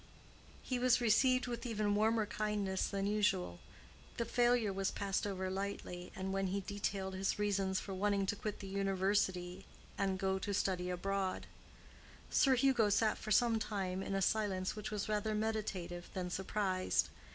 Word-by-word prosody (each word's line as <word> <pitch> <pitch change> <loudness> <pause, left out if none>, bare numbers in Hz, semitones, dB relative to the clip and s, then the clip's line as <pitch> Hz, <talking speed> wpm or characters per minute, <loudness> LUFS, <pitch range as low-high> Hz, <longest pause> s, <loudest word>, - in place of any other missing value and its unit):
He 255 -2 -1
was 250 -1 +4
received 255 +2 +4
with 240 -1 -4
even 215 -4 0
warmer 220 +1 +3
kindness 205 -2 -1
than 195 -1 -2
usual, 200 - +1 0.6
the 235 - 0
failure 240 -3 +2
was 195 0 0
passed 200 0 -1
over 190 -1 -2
lightly, 190 -2 -4
and 190 0 -3
when 195 0 0
he 195 +2 -1
detailed 195 -1 -3
his 190 +1 -1
reasons 195 -2 +1
for 195 - -6
wishing 200 +1 +1
to 200 - -1
quit 210 0 -5
the 195 - -6
university 190 -1 0 0.4
and 195 -1 +1
go 190 0 0
to 200 +1 -2
study 180 -2 0
abroad, 190 +1 -1 0.9
Sir 270 -2 +5
Hugo 250 -4 +3
sat 215 +2 +2
for 215 - -7
some 225 +1 +4
time 190 -4 -2
in 195 0 -3
a 195 - +1
silence 195 -2 0
which 210 -2 -5
was 210 -2 -3
rather 215 0 0
meditative 210 -5 -3
than 180 -1 -3
surprised. 190 0 0
200 Hz, 165 wpm, -35 LUFS, 190-215 Hz, 0.9 s, Sir